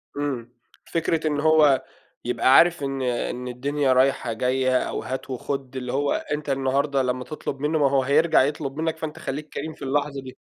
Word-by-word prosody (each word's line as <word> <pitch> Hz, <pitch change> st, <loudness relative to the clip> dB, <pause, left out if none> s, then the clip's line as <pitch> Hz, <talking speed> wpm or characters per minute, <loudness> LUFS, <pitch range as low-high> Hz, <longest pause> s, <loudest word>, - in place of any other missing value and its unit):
إمم. 130 Hz, -5 st, -3 dB, 0.3 s
فكرة 160 Hz, -1 st, -1 dB
إن 145 Hz, -1 st, 0 dB
هو 150 Hz, -3 st, +4 dB, 0.4 s
يبقى 130 Hz, +2 st, +3 dB
عارف 170 Hz, -2 st, +5 dB
إن 135 Hz, -1 st, -2 dB
إن 125 Hz, 0 st, -2 dB
الدنيا 135 Hz, +2 st, 0 dB
رايحة، 130 Hz, -2 st, +2 dB
جاية 130 Hz, +2 st, +1 dB
أو -, -, -2 dB
هات 130 Hz, +1 st, -5 dB
وخُد، 135 Hz, 0 st, -4 dB
اللي 125 Hz, -1 st, -4 dB
هو 140 Hz, +1 st, +1 dB
أنت 150 Hz, 0 st, -3 dB
النهاردة 135 Hz, +1 st, +1 dB
لمّا 125 Hz, 0 st, -1 dB
تطلُب 140 Hz, -1 st, -6 dB
منّه، 150 Hz, +2 st, 0 dB
ما 140 Hz, -2 st, +4 dB
هو 135 Hz, -1 st, +2 dB
هيرجع 150 Hz, +5 st, +4 dB
يطلُب 145 Hz, 0 st, -3 dB
منّك، 160 Hz, 0 st, -1 dB
فأنت 160 Hz, -1 st, -6 dB
خلّيك 150 Hz, +3 st, -5 dB
كريم 155 Hz, +2 st, -4 dB
في -, -, -21 dB
اللحظة 140 Hz, 0 st, -1 dB
دي. 130 Hz, -1 st, -11 dB
140 Hz, 185 wpm, -24 LUFS, 130-150 Hz, 0.4 s, عارف